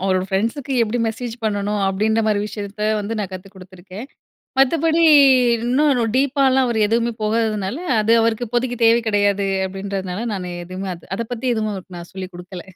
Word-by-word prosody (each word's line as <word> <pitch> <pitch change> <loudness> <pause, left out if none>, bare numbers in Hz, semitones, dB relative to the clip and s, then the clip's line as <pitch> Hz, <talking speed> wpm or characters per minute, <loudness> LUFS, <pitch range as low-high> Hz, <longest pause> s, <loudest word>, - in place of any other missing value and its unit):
"அவரோட 185 -1 +1
ஃப்ரெண்ட்ஸுக்கு 230 +8 -2
எப்படி 230 +2 -1
மெசேஜ் 225 +1 -4
பண்ணணும்?" 205 0 -1
அப்படீன்ற 215 +4 +1
மாரி 210 -2 +1
விஷயத்த 205 0 -7 0.2
வந்து 220 +2 -4
நான் 195 -2 -4
கத்து 185 +1 -8
குடுத்துருக்கேன். 185 +4 -11 0.5
மத்தபடி, 325 +4 +3 0.6
"இன்னும் 270 +1 +2 0.2
டீப்பால்லாம் 265 -1 +2
அவர் 230 -2 -1
எதுவுமே 230 +2 0
போகாததுனால, 215 -1 -1 0.2
அது 220 +2 +2
அவருக்கு 230 +1 0
இப்போதைக்கு 245 +1 -1
தேவை 230 +1 +5
கிடையாது." 205 -1 +1 0.2
அப்படீன்றதுனால 195 +1 -5
நானு 180 -2 -5
எதுவுமே 185 +2 -6
அது 170 - -19
அத 230 - -3
பத்தி 245 +2 -3
எதுவும் 215 -1 -2
அவருக்கு 185 -1 -9
நான் 170 - -10
சொல்லிக் 190 -1 -7
குடுக்கல. 180 0 -9
210 Hz, 160 wpm, -20 LUFS, 190-235 Hz, 0.6 s, தேவை